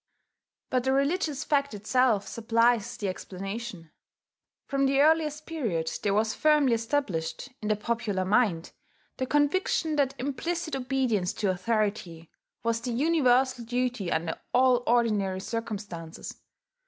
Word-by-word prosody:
But 255 Hz, -1 st, +1 dB
the 265 Hz, +1 st, +1 dB
religious 295 Hz, +1 st, 0 dB
fact 280 Hz, -5 st, 0 dB
itself 215 Hz, 0 st, +2 dB
supplies 230 Hz, -1 st, +1 dB
the 205 Hz, -, -3 dB
explanation. 195 Hz, -1 st, -6 dB, 0.7 s
From 275 Hz, -1 st, +1 dB
the 275 Hz, 0 st, +2 dB
earliest 305 Hz, 0 st, +3 dB
period 215 Hz, -, -2 dB
there 200 Hz, -1 st, +1 dB
was 220 Hz, +1 st, +1 dB
firmly 300 Hz, -4 st, +3 dB
established, 225 Hz, -, -2 dB
in 210 Hz, -, -4 dB
the 215 Hz, -, +2 dB
popular 210 Hz, -3 st, -2 dB
mind, 195 Hz, -5 st, +1 dB, 0.5 s
the 260 Hz, -, -2 dB
conviction 305 Hz, +2 st, +1 dB
that 275 Hz, -2 st, 0 dB
implicit 315 Hz, +4 st, -2 dB
obedience 250 Hz, -8 st, 0 dB
to 205 Hz, -3 st, 0 dB
authority 190 Hz, -4 st, -2 dB, 0.3 s
was 230 Hz, 0 st, 0 dB
the 245 Hz, 0 st, -3 dB
universal 260 Hz, -3 st, +2 dB
duty 245 Hz, -5 st, -2 dB
under 160 Hz, 0 st, -1 dB, 0.2 s
all 255 Hz, -1 st, +5 dB
ordinary 210 Hz, -6 st, +2 dB
circumstances. 200 Hz, -6 st, -6 dB
235 Hz, 125 wpm, -28 LUFS, 205-275 Hz, 0.7 s, all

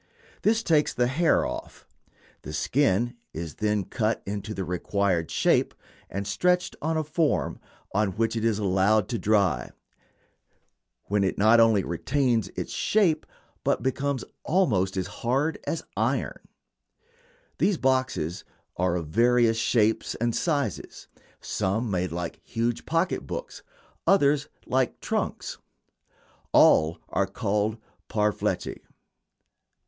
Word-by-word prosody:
This 225 Hz, +1 st, +2 dB
takes 155 Hz, -5 st, +2 dB
the 125 Hz, -, +2 dB
hair 155 Hz, +7 st, +2 dB
off. -, -, -7 dB, 0.6 s
The 75 Hz, -, -8 dB
skin 120 Hz, -, +1 dB, 0.2 s
is 80 Hz, -1 st, -6 dB
then 105 Hz, -1 st, +1 dB
cut 110 Hz, +2 st, -1 dB
into 105 Hz, +1 st, -4 dB
the 95 Hz, -, -2 dB
required 90 Hz, -1 st, 0 dB
shape -, -, +2 dB, 0.3 s
and 100 Hz, +2 st, -4 dB
stretched 180 Hz, -, +1 dB
on 160 Hz, +1 st, 0 dB
a 155 Hz, -, 0 dB
form, 155 Hz, 0 st, 0 dB, 0.3 s
on 105 Hz, -2 st, +1 dB
which 115 Hz, +2 st, 0 dB
it 110 Hz, -, -2 dB
is 115 Hz, -3 st, +2 dB
allowed 100 Hz, +1 st, +2 dB
to 115 Hz, -, -2 dB
dry, 100 Hz, -, +2 dB, 1.3 s
when 100 Hz, 0 st, 0 dB
it 95 Hz, -, 0 dB
not 110 Hz, +3 st, +5 dB
only 110 Hz, -4 st, +5 dB
retains 115 Hz, -, 0 dB
its -, -, -4 dB
shape 185 Hz, -8 st, +2 dB, 0.4 s
but -, -, +1 dB
becomes 135 Hz, 0 st, -1 dB, 0.2 s
almost 105 Hz, -, +1 dB
as 95 Hz, -, 0 dB
hard 130 Hz, -, -1 dB
as 165 Hz, -, -2 dB
iron. -, -, -1 dB, 1.2 s
These 200 Hz, -4 st, +2 dB
boxes 130 Hz, -, 0 dB, 0.3 s
are 90 Hz, -1 st, +1 dB
of 85 Hz, -2 st, -2 dB
various 115 Hz, +6 st, +3 dB
shapes 110 Hz, -1 st, +1 dB
and 120 Hz, 0 st, -1 dB
sizes 145 Hz, -, -2 dB, 0.3 s
some 110 Hz, +4 st, -1 dB
made 90 Hz, -2 st, -1 dB
like 85 Hz, 0 st, -4 dB
huge 115 Hz, 0 st, -2 dB
pocket 165 Hz, +3 st, 0 dB
books, -, -, -6 dB, 0.5 s
others 150 Hz, -6 st, +4 dB, 0.2 s
like 130 Hz, -1 st, 0 dB
trunks. -, -, -3 dB, 0.9 s
All 80 Hz, +2 st, +5 dB
are -, -, +1 dB
called 105 Hz, +2 st, -1 dB, 0.3 s
"parfleche." 105 Hz, -1 st, -1 dB
110 Hz, 125 wpm, -26 LUFS, 95-140 Hz, 1.3 s, not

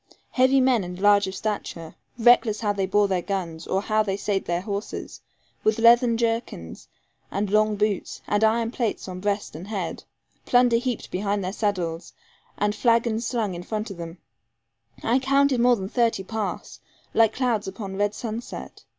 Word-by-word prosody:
Heavy 260 Hz, +1 st, +4 dB
men 255 Hz, -5 st, +3 dB
and 180 Hz, 0 st, -7 dB
large 205 Hz, 0 st, +4 dB
of 190 Hz, -, -5 dB
stature, 180 Hz, -5 st, -4 dB, 0.2 s
reckless 230 Hz, -2 st, +4 dB
how 205 Hz, -2 st, +1 dB
they 195 Hz, -2 st, -1 dB
bore 205 Hz, +1 st, +3 dB
their 185 Hz, -2 st, 0 dB
guns, 175 Hz, -4 st, -4 dB
or 195 Hz, +1 st, 0 dB
how 215 Hz, 0 st, +2 dB
they 195 Hz, -2 st, -1 dB
sate 200 Hz, -1 st, -1 dB
their 175 Hz, 0 st, -1 dB
horses, 200 Hz, +1 st, -5 dB, 0.4 s
with 215 Hz, 0 st, +2 dB
leathern 235 Hz, 0 st, +5 dB
jerkins, 225 Hz, -, -3 dB, 0.4 s
and 200 Hz, 0 st, -2 dB
long 215 Hz, 0 st, +3 dB
boots, 210 Hz, -2 st, -1 dB
and 205 Hz, +1 st, +1 dB
iron 225 Hz, +1 st, +2 dB
plates 235 Hz, -5 st, -2 dB
on 185 Hz, -1 st, -6 dB
breast 205 Hz, -1 st, -2 dB
and 170 Hz, +5 st, -8 dB
head, 210 Hz, -2 st, -4 dB, 0.4 s
plunder 245 Hz, -1 st, +4 dB
heaped 245 Hz, 0 st, -3 dB
behind 200 Hz, +1 st, -1 dB
their 185 Hz, +1 st, -3 dB
saddles, 180 Hz, -6 st, -2 dB, 0.4 s
and 205 Hz, 0 st, +1 dB
flagons 230 Hz, 0 st, +1 dB
slung 220 Hz, -6 st, -1 dB
in 175 Hz, -, -6 dB
front 215 Hz, +3 st, -4 dB
of 195 Hz, -, -8 dB
them; 170 Hz, 0 st, -7 dB, 0.9 s
I 240 Hz, +3 st, +3 dB
counted 275 Hz, 0 st, +2 dB
more 245 Hz, +1 st, +5 dB
than 190 Hz, -4 st, -5 dB
thirty 230 Hz, -2 st, +1 dB
pass, 220 Hz, +1 st, -5 dB, 0.3 s
like 225 Hz, -1 st, +4 dB
clouds 240 Hz, -6 st, 0 dB
upon 195 Hz, 0 st, -6 dB
red 205 Hz, +1 st, 0 dB
sunset. 230 Hz, +1 st, -7 dB
210 Hz, 170 wpm, -24 LUFS, 195-230 Hz, 0.9 s, leathern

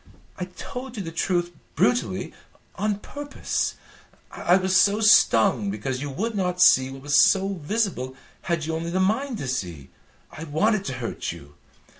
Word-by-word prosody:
"I 180 Hz, -, -2 dB
told 250 Hz, -1 st, -7 dB
you 200 Hz, -, -3 dB
the 165 Hz, -, -6 dB
truth 175 Hz, +1 st, -1 dB, 0.2 s
brutally 120 Hz, -6 st, 0 dB, 0.4 s
on 210 Hz, +1 st, -1 dB
purpose. 290 Hz, 0 st, -3 dB, 0.6 s
I 175 Hz, -, +2 dB
was 190 Hz, 0 st, 0 dB
so 200 Hz, +2 st, +4 dB
stung 115 Hz, -, +4 dB
because 125 Hz, +6 st, -3 dB
you 145 Hz, -, -4 dB
would 215 Hz, -, -3 dB
not 180 Hz, -3 st, -1 dB
see 130 Hz, -7 st, +6 dB
what 135 Hz, 0 st, -10 dB
was 145 Hz, -1 st, +5 dB
so 195 Hz, 0 st, +3 dB
visible 145 Hz, -, -2 dB, 0.3 s
had 170 Hz, -3 st, -2 dB
you 160 Hz, -, -3 dB
only 165 Hz, +1 st, -3 dB
the 180 Hz, +2 st, -1 dB
mind 225 Hz, +7 st, 0 dB
to 135 Hz, -, -5 dB
see. 85 Hz, -, -4 dB, 0.4 s
I 160 Hz, -, -8 dB
wanted 200 Hz, +7 st, +1 dB
to 130 Hz, -, -3 dB
hurt 125 Hz, -3 st, -4 dB
you. 75 Hz, -4 st, -12 dB
170 Hz, 165 wpm, -24 LUFS, 130-200 Hz, 0.6 s, see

